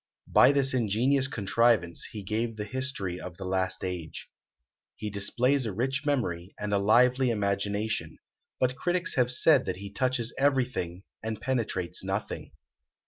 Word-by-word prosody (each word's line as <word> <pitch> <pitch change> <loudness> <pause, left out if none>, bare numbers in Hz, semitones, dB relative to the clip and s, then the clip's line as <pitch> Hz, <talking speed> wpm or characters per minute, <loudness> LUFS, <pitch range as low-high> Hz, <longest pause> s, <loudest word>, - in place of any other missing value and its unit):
By 130 - +6
this 135 -2 +1
ingenious 130 +4 +2
contrivance 110 -6 +1
he 105 -2 -7
gave 110 +3 -2
the 105 - -4
history 105 -7 -2
of 90 -2 -8
the 95 - -6
last 95 0 -1
age. 90 -4 -5 0.6
He 105 -1 -5
displays 125 +6 +1
a - - -2
rich 135 +7 -2
memory, 95 -11 -1
and 105 0 -2
a 100 - +3
lively 125 +5 +4
imagination; 100 -4 -1 0.4
but 130 0 +1
critics 175 +5 0
have 125 -1 +2
said 135 +1 +4
that 90 -1 -3
he 100 +1 -8
touches 125 0 0
everything, 125 -10 0 0.2
and 110 -1 -4
penetrates 115 -8 -2
nothing. - - -4
110 Hz, 145 wpm, -28 LUFS, 100-130 Hz, 0.6 s, By